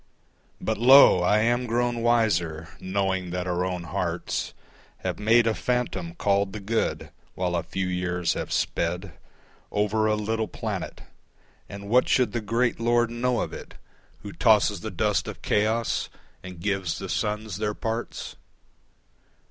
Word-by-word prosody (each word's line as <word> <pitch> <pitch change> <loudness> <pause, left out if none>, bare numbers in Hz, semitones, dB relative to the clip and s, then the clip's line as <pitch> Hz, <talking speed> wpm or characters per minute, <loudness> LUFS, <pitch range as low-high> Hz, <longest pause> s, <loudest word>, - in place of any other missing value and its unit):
But - - -2
lo! 130 -6 +8
I 105 +4 +3
am 120 +2 +1
grown 120 0 0
wiser, 90 -10 +1
knowing 95 -1 -1
that 90 0 -3
our 90 0 -1
own 90 -1 -3
hearts 85 - -3 0.5
Have - - -3
made 115 +2 +4
a 115 - +2
phantom 105 -9 -2
called 100 +1 +1
the 110 - -5
Good, 110 +3 -2 0.2
while 90 -1 -1
a 85 - +1
few 90 +3 -3
years 90 -1 -1
have - - -5
sped 90 +2 -1 0.6
Over 105 +1 +1
a 110 - +2
little 110 +1 -1
planet. - - -5 0.7
And 100 0 -8
what 125 +4 +3
should 125 -5 +3
the 120 - -2
great 115 +3 0
Lord 120 0 +2
know 120 0 0
of - - -4
it - - -9 0.5
Who - - -7
tosses - - +3
the - - -5
dust - - 0
of - - -8
chaos 110 +2 0 0.3
and 90 -2 -9
gives 95 -3 -1
the 95 - -6
suns 105 0 -2
their 105 0 -2
parts? 115 +1 -4
105 Hz, 150 wpm, -25 LUFS, 90-115 Hz, 0.7 s, lo